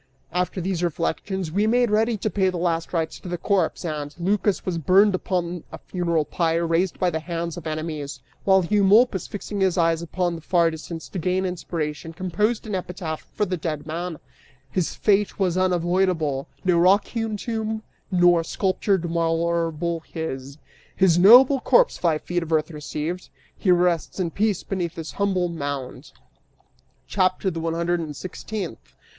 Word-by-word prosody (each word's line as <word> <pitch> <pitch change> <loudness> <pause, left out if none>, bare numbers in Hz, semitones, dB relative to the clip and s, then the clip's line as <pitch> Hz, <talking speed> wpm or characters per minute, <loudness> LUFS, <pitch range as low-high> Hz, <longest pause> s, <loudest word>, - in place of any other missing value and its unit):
} - - -39
(After 180 +2 -1
these 180 -1 -2
reflections 175 +2 -2
we 205 +5 +1
made 240 0 +3
ready 220 +2 +2
to 215 - -1
pay 190 -2 +2
the 180 - -3
last 165 -1 -1
rites 165 -2 -2
to - - -10
the 175 - -2
corpse,) 180 -1 0
and 150 -2 -4
Lycas 200 +3 0
was 175 -3 -1
burned 195 +6 +5
upon 180 -2 -2
a - - -7
funeral 170 -4 -1
pyre 170 0 0
raised 165 +2 +1
by 180 -1 +1
the 160 - -1
hands 170 0 -4
of 170 -3 -7
enemies, 155 -3 -4 0.2
while 190 -2 +4
Eumolpus, 205 +1 +4
fixing 205 0 -5
his 190 -2 +2
eyes 165 -1 +2
upon 175 +1 -1
the 165 - -7
far 170 0 +2
distance 160 +1 -7
to 190 - -4
gain 185 +2 0
inspiration, 165 -3 -4
composed 185 +7 -1
an 215 - -5
epitaph 180 -3 -4
for 210 - +1
the 185 -1 -2
dead 155 -3 -4
man: 165 +1 -4 0.5
HIS 180 0 -1
FATE 205 -1 +2
WAS 185 -3 +1
UNAVOIDABLE 175 -5 +1 0.2
NO 180 -2 +4
ROCK 190 +4 +5
HEWN 225 -2 -2
TOMB 220 0 -3 0.3
NOR 175 -2 +4
SCULPTURED 190 +1 0
MARBLE 165 0 0
HIS, 140 -4 -5 0.4
HIS 180 -3 +4
NOBLE 250 +8 +8
CORPSE - - +3
FIVE 160 -3 +1
FEET 175 0 -1
OF 165 -1 -6
EARTH 155 +1 +1
RECEIVED, 155 +3 -5 0.3
HE 190 - 0
RESTS 175 0 +2
IN 175 -3 -1
PEACE 210 0 0
BENEATH 175 -4 -3
THIS 160 -1 -6
HUMBLE 190 -3 0
MOUND. 140 -5 -5 0.9
CHAPTER 185 0 +1
THE 165 - -4
ONE 165 0 -2
HUNDRED 170 +1 0
AND 155 -3 -5
SIXTEENTH. 185 - -6
175 Hz, 170 wpm, -24 LUFS, 165-190 Hz, 0.9 s, NOBLE